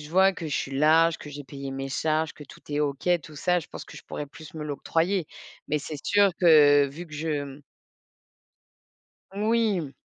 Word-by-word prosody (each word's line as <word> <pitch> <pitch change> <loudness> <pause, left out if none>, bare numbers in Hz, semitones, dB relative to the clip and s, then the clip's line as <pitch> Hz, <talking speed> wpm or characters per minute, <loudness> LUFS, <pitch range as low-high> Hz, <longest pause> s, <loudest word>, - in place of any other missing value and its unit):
je 150 - -10
vois 190 +4 +4
que 170 -3 -6
je 145 - -3
suis 135 - -3
large, 160 +2 +4
que 150 - -10
j'ai 145 0 -7
payé 135 0 -7
mes 135 0 -4
charges, 155 +3 0
que 150 - -12
tout 135 - -15
est 145 0 -2
OK 145 +2 -1 0.2
tout 155 - -12
ça, 180 +4 +1
je 165 - -8
pense - - -9
que - - -13
je - - -12
pourrais 150 - -6
plus 150 +2 -13
me 155 - -5
l'octroyer. 165 +4 -1 0.4
Mais 150 - 0
c'est 150 +1 -6
sûr 205 -1 +4
que 145 -4 +7
vu 155 +6 -9
que - - -17
je, 150 -1 -2
mmh 140 +1 -11 1.7
Oui, 215 -1 +1
mmh. 145 -4 -7
155 Hz, 210 wpm, -26 LUFS, 145-170 Hz, 1.7 s, que